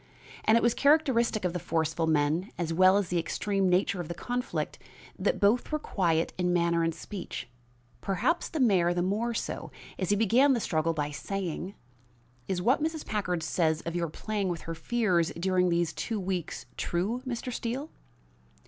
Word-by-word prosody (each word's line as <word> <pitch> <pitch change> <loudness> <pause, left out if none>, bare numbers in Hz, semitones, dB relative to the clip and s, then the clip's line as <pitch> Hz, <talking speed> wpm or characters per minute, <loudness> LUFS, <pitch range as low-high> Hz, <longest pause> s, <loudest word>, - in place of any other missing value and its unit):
And 220 +1 +6
it - - +1
was 235 -1 +4
characteristic 265 -8 +3
of 175 - 0
the 180 - -2
forceful 160 0 0
men, 160 +5 +1
as 165 -2 -2
well 185 +3 +6
as 200 -4 -1
the 175 - +1
extreme 195 +3 0
nature 180 +1 +2
of 170 - -7
the 170 - -5
conflict, 245 +7 -3 0.4
that - - +1
both 215 +8 +2
were 305 - +1
quiet 170 - 0
in 180 0 +2
manner 170 -1 +2
and 165 -1 0
speech 185 - -6 0.5
perhaps 225 - 0
the 320 - -3
mayor 185 -8 +3
the 175 - +1
more 220 +5 0
so, - - -4 0.3
as 185 - -1
he 205 - +4
began 235 +7 +4
the 245 - +1
struggle 165 -4 0
by 150 -2 -2
saying: 190 +3 -4 0.7
"Is 180 -2 -1
what 260 +7 +3
Mrs. 315 0 -2
Packard 180 -6 -1
says 160 -1 +1
of 170 0 -5
your 170 -2 -1
playing 205 +3 -2
with 170 -2 -3
her 165 - -5
fears 175 -1 +1
during 180 0 +2
these 170 -2 +1
two 210 +9 -3
weeks 180 -3 -3
true, 200 +8 -1
Mr. 250 0 -3
Steele?" 255 +7 -3
185 Hz, 180 wpm, -29 LUFS, 170-230 Hz, 0.7 s, And